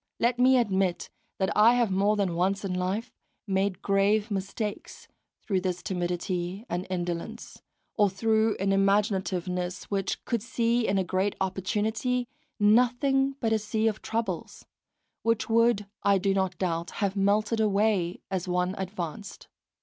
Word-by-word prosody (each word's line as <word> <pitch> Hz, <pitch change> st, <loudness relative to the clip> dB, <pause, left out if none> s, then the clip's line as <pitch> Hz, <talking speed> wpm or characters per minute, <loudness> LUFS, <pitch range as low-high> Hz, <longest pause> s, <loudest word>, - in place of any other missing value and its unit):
Let 245 Hz, +1 st, +1 dB
me 260 Hz, +1 st, +6 dB
admit 195 Hz, -6 st, 0 dB, 0.3 s
that 190 Hz, -, 0 dB
I 225 Hz, +3 st, +6 dB
have 240 Hz, -4 st, +2 dB
more 200 Hz, +3 st, +2 dB
than 195 Hz, -4 st, 0 dB
once 195 Hz, +4 st, 0 dB
in 185 Hz, -, -2 dB
life 190 Hz, +6 st, -2 dB, 0.3 s
made 195 Hz, -2 st, -1 dB
grave 205 Hz, +2 st, +2 dB
mistakes 200 Hz, +2 st, -4 dB, 0.4 s
through 190 Hz, -3 st, 0 dB
this 180 Hz, -1 st, -3 dB
timidity 180 Hz, +1 st, -3 dB
and 175 Hz, -2 st, -3 dB
indolence, 175 Hz, +5 st, -4 dB, 0.3 s
or 205 Hz, -1 st, +3 dB
through 220 Hz, +3 st, +1 dB
an 195 Hz, +1 st, 0 dB
imaginativeness 190 Hz, -2 st, 0 dB
which 195 Hz, -1 st, -2 dB
could 235 Hz, -3 st, -1 dB
see 235 Hz, 0 st, 0 dB
in 195 Hz, -, +1 dB
a 190 Hz, -, +2 dB
great 190 Hz, +2 st, -1 dB
opportunity 215 Hz, +6 st, -1 dB, 0.3 s
nothing 250 Hz, +5 st, +3 dB
but 225 Hz, -2 st, +1 dB
a 220 Hz, -, +2 dB
sea 215 Hz, +1 st, 0 dB
of 215 Hz, -1 st, -1 dB
troubles, 230 Hz, +1 st, -4 dB, 0.6 s
which 230 Hz, 0 st, 0 dB
would, 230 Hz, -2 st, +3 dB, 0.2 s
I 200 Hz, -1 st, +4 dB
do 195 Hz, +1 st, +1 dB
not 190 Hz, -2 st, -1 dB
doubt, 170 Hz, -2 st, -2 dB, 0.2 s
have 195 Hz, 0 st, -2 dB
melted 210 Hz, +3 st, +1 dB
away 200 Hz, -4 st, +1 dB
as 190 Hz, -1 st, -2 dB
one 180 Hz, +1 st, 0 dB
advanced. 190 Hz, +1 st, -6 dB
200 Hz, 145 wpm, -27 LUFS, 185-220 Hz, 0.6 s, me